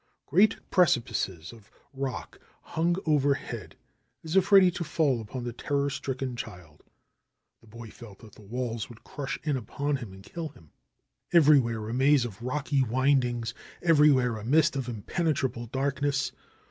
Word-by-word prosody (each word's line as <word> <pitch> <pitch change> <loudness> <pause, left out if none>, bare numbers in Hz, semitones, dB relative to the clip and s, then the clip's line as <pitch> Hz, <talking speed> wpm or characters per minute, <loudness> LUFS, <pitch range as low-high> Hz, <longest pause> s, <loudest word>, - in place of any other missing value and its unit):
Great 200 +8 +4
precipices 115 - +1
of 110 -3 -17 0.2
rock 135 -1 -5 0.2
hung 170 +2 0
overhead, 145 -3 0 0.5
as 160 +2 -4
if 190 +1 +3
ready 190 -2 +8
to 175 0 -4
fall 150 -6 +1
upon 120 +4 -6
the 120 -1 -4
terror 140 +3 -1
stricken 130 -1 -4
child. 90 -10 -9 0.8
The 115 - -21
boy 115 0 -10
felt 110 -5 -13
that 110 -3 -14
the - - -16
walls 115 +1 -4
would 115 -2 -14
crush 140 -2 -5
in 150 -2 0
upon 140 +4 -2
him 120 -6 -8
and 95 0 -13
kill 165 - -6
him. 80 - -20 0.6
Everywhere 135 -9 +4
a 115 - -4
maze 135 0 +4
of 110 -3 -8
rocky 140 +2 0
windings, 125 -2 +1 0.3
everywhere 145 -8 +4
a 105 - -8
mist 155 +5 +3
of 130 -2 -3
impenetrable 130 - -2
darkness. 140 +2 -1
130 Hz, 150 wpm, -28 LUFS, 115-150 Hz, 0.8 s, ready